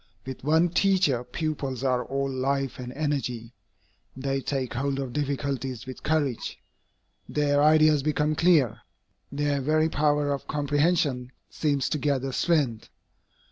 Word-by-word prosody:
With 130 -1 -7
one 160 +4 +3
teacher 180 -9 +2
pupils 135 -1 -3
are 125 -2 +1
all 135 +1 -2
life 135 0 -1
and 125 -1 -6
energy, 130 -6 -3 0.6
they 135 0 -1
take 130 -3 -2
hold 135 +2 -1
of 135 -3 -4
difficulties 140 -3 -2
with 130 -1 -8
courage, 145 -6 -1 0.7
their 145 -1 +2
ideas 155 -1 +5
become 150 +1 +1
clear, 155 - +3 0.5
their 145 0 0
very 155 +3 +2
power 145 -1 +1
of 140 - -6
comprehension 145 -3 0 0.2
seems 145 -4 0
to 150 - -1
gather 135 -2 0
strength. 140 -7 0
140 Hz, 130 wpm, -26 LUFS, 130-150 Hz, 0.7 s, ideas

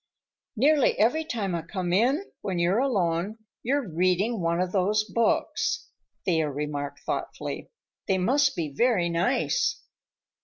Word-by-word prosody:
"Nearly 285 +3 +4
every 270 +9 +3
time 215 - -3
I 170 - -1
come 175 +1 -3
in, 260 - +2 0.2
when 190 -3 -2
you're 175 +5 +2
alone, 200 -6 0 0.2
you're 270 0 0
reading 185 +6 +1
one 170 0 +1
of 180 0 0
those 205 +2 +2
books," 230 - 0 0.4
Thea 160 -4 +2
remarked 145 0 -4
thoughtfully. - - -4 0.4
"They 190 - +2
must 265 +9 +2
be 160 -5 -3
very 220 - +2
nice." 180 +10 +1
195 Hz, 130 wpm, -26 LUFS, 170-240 Hz, 0.4 s, Nearly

